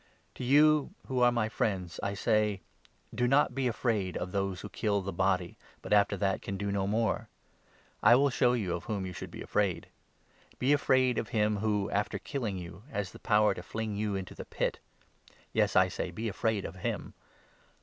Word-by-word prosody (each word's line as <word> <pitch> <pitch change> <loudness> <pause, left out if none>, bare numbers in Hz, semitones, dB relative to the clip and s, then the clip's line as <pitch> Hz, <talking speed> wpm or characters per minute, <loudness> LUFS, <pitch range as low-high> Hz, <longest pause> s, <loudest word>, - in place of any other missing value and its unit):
To - - -7
you 150 +3 +4
who 130 -1 -1
are 120 0 +6
my 120 -2 +1
friends 95 -5 -2
I 100 0 -2
say, 105 -1 +1 0.5
Do 120 +2 +1
not 135 0 +3
be 135 0 0
afraid 110 -6 -1
of 90 - -4
those 95 -1 -2
who - - -7
kill 100 -2 0
the 95 0 -5
body, 90 0 0 0.3
but - - -1
after 100 -1 +4
that 95 0 0
can 100 - -4
do 100 0 -2
no 100 -1 0
more. 110 +2 0 0.7
I 120 - +7
will 140 +2 +3
show 125 -1 +3
you 100 -8 -1
of 85 - -4
whom 100 -3 -2
you 90 - -5
should - - -7
be - - -8
afraid. 100 -5 -1 0.7
Be 135 +3 +3
afraid 130 -3 +3
of 110 - -4
him 105 -3 +1
who, 105 -1 0
after 105 0 0
killing 110 -2 -3
you, 90 +1 -8
has 100 -7 -3
the - - -12
power 105 -1 +3
to - - -7
fling 110 +3 -4
you 105 -1 -1
into 95 -1 -5
the - - -8
Pit. - - -2 0.7
Yes, - - +2
I 95 0 +6
say, 95 - -4
be 110 +7 -4
afraid 110 0 -1
of - - -7
him. 90 - -3
105 Hz, 200 wpm, -30 LUFS, 95-120 Hz, 0.7 s, I